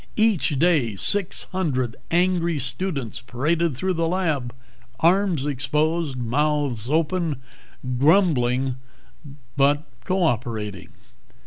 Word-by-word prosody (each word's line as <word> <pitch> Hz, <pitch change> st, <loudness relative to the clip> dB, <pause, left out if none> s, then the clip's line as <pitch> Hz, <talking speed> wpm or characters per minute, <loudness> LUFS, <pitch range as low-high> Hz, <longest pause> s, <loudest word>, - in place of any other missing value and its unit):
Each 215 Hz, -10 st, +2 dB
day 145 Hz, -, +2 dB
six 195 Hz, -, 0 dB
hundred 130 Hz, -11 st, -1 dB
angry 170 Hz, -1 st, +2 dB
students 135 Hz, -, -3 dB
paraded 150 Hz, +4 st, 0 dB
through 185 Hz, +6 st, 0 dB
the 165 Hz, -1 st, 0 dB
lab, 160 Hz, -9 st, -1 dB, 0.5 s
arms 175 Hz, -3 st, +2 dB
exposed, 150 Hz, +2 st, 0 dB
mouths 130 Hz, -1 st, 0 dB
open, 160 Hz, -1 st, 0 dB, 0.6 s
grumbling 135 Hz, -6 st, +3 dB, 0.8 s
but 145 Hz, +2 st, +3 dB, 0.2 s
co 185 Hz, 0 st, 0 dB
operating. 110 Hz, -, -2 dB
150 Hz, 95 wpm, -23 LUFS, 130-170 Hz, 0.8 s, grumbling